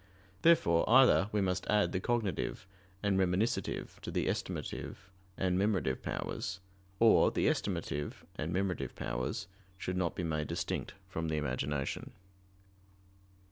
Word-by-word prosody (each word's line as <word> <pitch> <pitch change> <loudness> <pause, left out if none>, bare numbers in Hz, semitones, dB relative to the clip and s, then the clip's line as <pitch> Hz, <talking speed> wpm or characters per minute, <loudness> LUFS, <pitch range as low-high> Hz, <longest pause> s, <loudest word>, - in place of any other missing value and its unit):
Therefore 85 - +5
either 125 -5 +6
we 105 - +1
must 90 -1 -1
add 105 0 +3
the 95 - 0
cognitive 105 -5 -1 0.4
and 100 -2 +2
reminiscitive 95 +5 0
to - - -6
the - - 0
estimative - - -3 0.4
and 90 -1 +1
memorative 95 -10 +1
powers, 95 - -3 0.4
or 115 -1 +6
the - - 0
estimative 75 0 -1
and 80 +2 -3
memorative 90 -8 -1
powers 65 +9 -3 0.3
should 90 0 -3
not 85 -3 0
be 90 - -3
made 80 -3 -1
distinct - - -3
from 80 0 -3
the 80 -1 0
imagination. 75 - -2
90 Hz, 130 wpm, -33 LUFS, 80-100 Hz, 0.4 s, either